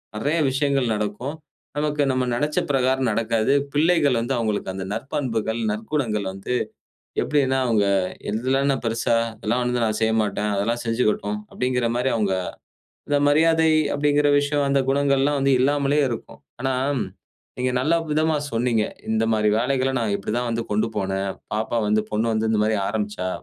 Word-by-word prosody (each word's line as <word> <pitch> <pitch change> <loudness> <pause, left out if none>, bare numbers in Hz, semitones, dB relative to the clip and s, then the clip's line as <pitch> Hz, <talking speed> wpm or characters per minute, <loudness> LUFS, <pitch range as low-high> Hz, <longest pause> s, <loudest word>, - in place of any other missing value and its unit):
நெறைய 145 +10 0
விஷயங்கள் 135 -3 +1
நடக்கும். 105 +7 -3 0.4
நமக்கு 150 0 0
நம்ம 130 -1 +1
நினைச்ச 150 +5 0
பிரகாரம் 130 -1 +2
நடக்காது, 115 +3 +1 0.2
பிள்ளைகள் 150 -4 +3
வந்து 120 +4 -1
அவங்களுக்கு 110 -5 -1
அந்த 95 0 -5
நற்பண்புகள், 115 -1 -2
நற்குணங்கள் 110 -1 -2
வந்து 95 +6 -5 0.7
எப்படினா, 135 -3 +1
அவங்க 110 -4 +2 0.4
இதெல்லாம் 130 +6 +1
நான் 135 - -2
பெரிசா! 115 +1 +1 0.2
இதெல்லாம் 115 +3 -1
வந்து 125 0 0
நான் 110 -1 0
செய்யமாட்டேன், 110 -2 +1
அதெல்லாம் 115 +4 -1
செஞ்சுகட்டும். 110 -3 0
அப்படின்கின்ற 125 -2 0
மாரி 125 +2 +1
அவங்க, 105 -4 +1 0.8
இந்த 145 0 +3
மரியாதை 160 +2 +4 0.3
அப்படின்கிற 145 0 +2
விஷயம் 145 0 0
அந்த 140 0 +3
குணங்கள்லாம் 140 +1 +2
வந்து 135 0 +3
இல்லாமலேயே 145 +2 +2
இருக்கும். 115 - -7 0.2
ஆனா 135 0 0 0.8
நீங்க 125 0 0
நல்ல 155 +6 +2 0.2
விதமா 155 +1 +2 0.2
சொன்னீங்க, 115 -1 +1 0.3
இந்த 110 0 +2
மாரி 105 -1 +2
வேலைகள 130 +2 +1
நான் 110 -3 -1
இப்படி 100 - -5
தான் 120 0 -2
வந்து 115 0 -1
கொண்டு 105 +2 +1
போனேன், 95 -1 -1 0.2
பாப்பா 110 +2 -1
வந்து 105 +1 +3
பொண்ணு 110 +2 0
வந்து 110 0 0
இந்த 110 - +2
மாரி 110 0 +1
ஆரம்பிச்சா, 105 -3 -2
120 Hz, 150 wpm, -23 LUFS, 110-140 Hz, 0.8 s, மரியாதை